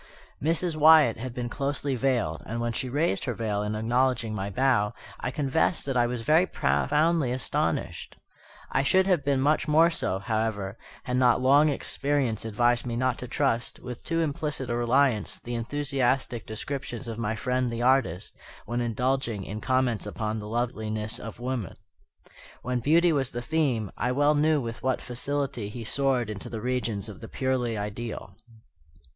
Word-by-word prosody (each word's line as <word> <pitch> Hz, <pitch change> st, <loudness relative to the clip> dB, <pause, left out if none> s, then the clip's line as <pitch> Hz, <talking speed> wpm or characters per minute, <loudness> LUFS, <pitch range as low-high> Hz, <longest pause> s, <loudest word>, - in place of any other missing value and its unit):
Mrs. 165 Hz, +2 st, +1 dB
Wyatt 155 Hz, -5 st, +6 dB
had 130 Hz, +2 st, -5 dB
been 120 Hz, 0 st, -4 dB
closely 140 Hz, +2 st, -2 dB
veiled; 120 Hz, -11 st, 0 dB
and 115 Hz, +2 st, -3 dB
when 120 Hz, 0 st, -1 dB
she 130 Hz, +3 st, -3 dB
raised 145 Hz, -, 0 dB
her -, -, -2 dB
veil 105 Hz, -3 st, -1 dB
in 105 Hz, +1 st, -2 dB
acknowledging 120 Hz, 0 st, +1 dB
my 100 Hz, -1 st, -3 dB
bow, 120 Hz, -2 st, +2 dB, 0.2 s
I -, -, -2 dB
confess 145 Hz, +5 st, 0 dB
that 135 Hz, -2 st, -3 dB
I 120 Hz, -1 st, +3 dB
was 120 Hz, -1 st, -4 dB
very 160 Hz, +7 st, +4 dB
profoundly 150 Hz, -4 st, +1 dB
astonished. 130 Hz, 0 st, -2 dB, 0.6 s
I -, -, +2 dB
should 185 Hz, +7 st, +3 dB
have 180 Hz, -7 st, +2 dB
been 140 Hz, -1 st, +1 dB
much 145 Hz, +3 st, +2 dB
more 160 Hz, +3 st, +5 dB
so, 95 Hz, -, -1 dB
however, 105 Hz, -1 st, -2 dB, 0.3 s
had 125 Hz, 0 st, -1 dB
not 125 Hz, -1 st, +4 dB
long 140 Hz, +4 st, +5 dB
experience 140 Hz, -5 st, -1 dB
advised 120 Hz, +2 st, +2 dB
me 120 Hz, -2 st, -3 dB
not 130 Hz, 0 st, 0 dB
to 125 Hz, -, -6 dB
trust, 125 Hz, -2 st, 0 dB
with 125 Hz, -1 st, -8 dB
too 165 Hz, -1 st, 0 dB
implicit 145 Hz, -4 st, -2 dB
a -, -, 0 dB
reliance, 120 Hz, -1 st, +2 dB
the 120 Hz, -, -7 dB
enthusiastic 130 Hz, -1 st, -1 dB
descriptions 130 Hz, +2 st, -5 dB
of 115 Hz, 0 st, -5 dB
my 110 Hz, -1 st, -1 dB
friend 125 Hz, +3 st, 0 dB
the 115 Hz, 0 st, -3 dB
artist, 125 Hz, -8 st, +1 dB, 0.3 s
when 120 Hz, +1 st, -2 dB
indulging 120 Hz, -2 st, -1 dB
in 105 Hz, +3 st, -6 dB
comments 130 Hz, -4 st, +1 dB
upon 110 Hz, +1 st, -3 dB
the 105 Hz, -, -7 dB
loveliness 110 Hz, -2 st, -2 dB
of 110 Hz, +1 st, -8 dB
woman. 125 Hz, -6 st, -3 dB, 0.9 s
When 125 Hz, 0 st, -1 dB
beauty 165 Hz, +7 st, +4 dB
was 135 Hz, -4 st, 0 dB
the 120 Hz, -, -3 dB
theme, 130 Hz, -, 0 dB
I 125 Hz, -, +1 dB
well 145 Hz, +3 st, +4 dB
knew 150 Hz, +1 st, +3 dB
with 115 Hz, -3 st, -5 dB
what 130 Hz, -1 st, 0 dB
facility 135 Hz, -3 st, -3 dB
he 115 Hz, +2 st, -7 dB
soared 130 Hz, 0 st, 0 dB
into 105 Hz, +3 st, -7 dB
the 115 Hz, -1 st, -5 dB
regions 115 Hz, -3 st, -2 dB
of 105 Hz, -, -10 dB
the 115 Hz, -, -7 dB
purely 125 Hz, -3 st, -1 dB
ideal. 105 Hz, -1 st, -5 dB
125 Hz, 170 wpm, -27 LUFS, 115-140 Hz, 0.9 s, Wyatt